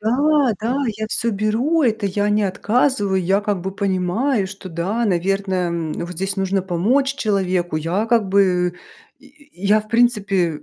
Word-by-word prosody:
Да, 275 +4 +2
да, 235 +4 -1 0.2
я 220 - -2
всё 230 +1 -1
беру, 225 +11 +1
это 220 -5 +1
я 205 +2 0
не 210 0 +2
отказываю, 205 -1 +1
я 190 +3 +2
как 205 -2 -2
бы 190 +2 -4
понимаю, 200 +4 0
что, 195 -1 -9
да, 185 +8 -2
наверное, 190 -1 0
м, 165 -2 -3
вот 170 - -5
здесь 190 +3 -3
нужно 195 0 0
помочь 235 +10 +1
человеку. 185 - -1
Я 175 +8 -1
как 225 -4 +2
бы 180 -2 +2 0.4
я - - -19 0.5
я - - -1
в 215 - -15
принципе, 195 -9 +1
200 Hz, 165 wpm, -20 LUFS, 185-225 Hz, 0.5 s, Да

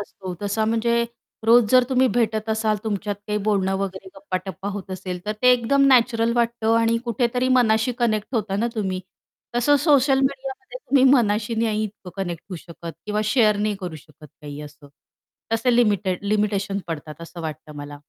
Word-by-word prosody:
असतो 190 -2 -7
तसा 205 +2 0
म्हणजे 235 +1 +1 0.4
रोज 235 0 +7
जर 255 -1 +6
तुम्ही 260 0 +3
भेटत 220 -2 0
असाल 220 -1 +1
तुमच्यात 205 -1 -2
काही 210 0 -1
बोलणं 195 -2 +1
वगैरे 190 -1 -5
गप्पाटप्पा 190 -1 -5
होत 195 -1 -7
असेल, 185 -1 -5
तर 210 - 0
ते 250 - +7
एकदम 275 +3 +3
नॅचरल 235 -3 +3
वाटतं 230 -1 +1
आणि 230 0 +2
कुठेतरी 245 +1 0
मनाशी 225 0 +3
कनेक्ट 220 0 0
होता 210 -3 -1
ना 230 - +1
तुम्ही? 190 -4 -2 0.6
तसं 290 +4 +4
सोशल 275 -3 +3
मीडियामध्ये 270 - -3
तुम्ही 275 - +2
मनाशी 225 -2 +2
नाही 220 -1 0
इतकं 200 -3 -9
कनेक्ट 175 -3 -5
होऊ 180 - -4
शकत 170 0 -9
किंवा 210 0 -1
शेअर 215 -2 +3
नाही 210 0 0
करू 175 -4 -5
शकत 150 +1 -16
काही 145 0 -8
असं, 145 0 -13 0.6
तसे 240 +2 +2
लिमिटेड 205 -5 +1
लिमिटेशन 200 -1 0
पडतात 155 -1 -6
असं 170 +1 -9
वाटतं 155 -1 -7
मला. 145 0 -8
215 Hz, 170 wpm, -23 LUFS, 190-235 Hz, 0.6 s, रोज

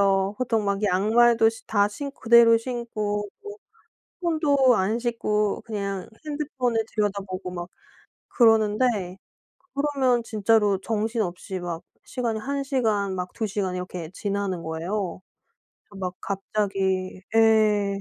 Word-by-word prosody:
맞아요. 195 0 +2
보통 225 -4 0
막 200 +1 -1
양말도 225 +4 +4
시 225 0 -7
다 205 -1 +2
신 280 +7 -6
그대로 230 -1 +6
신고 215 -4 -3
그리고 415 0 -9 0.6
손도 285 -7 +3
안 205 +5 +1
씻고 215 -3 -1
그냥 200 -4 -4 0.2
핸드폰을 260 -6 -1
들여다보고 195 -3 -2
막 175 -1 -6 0.6
그러는데 215 -4 +2 0.6
그러면 270 -4 +1
진짜로 210 -2 +2
정신없이 210 -4 -2
막 170 -2 -5 0.2
시간이 235 -4 -3
한 275 +4 -2
시간 215 -8 0
막 180 0 -4
두 220 - -2
시간 190 -3 -2
이렇게 180 -3 -5
지나는 200 -4 -2
거예요. 175 +4 -3 0.7
막 185 -2 -4
갑자기 195 -2 -2
예. 215 -3 +4
210 Hz, 255 characters per minute, -25 LUFS, 195-235 Hz, 0.7 s, 그대로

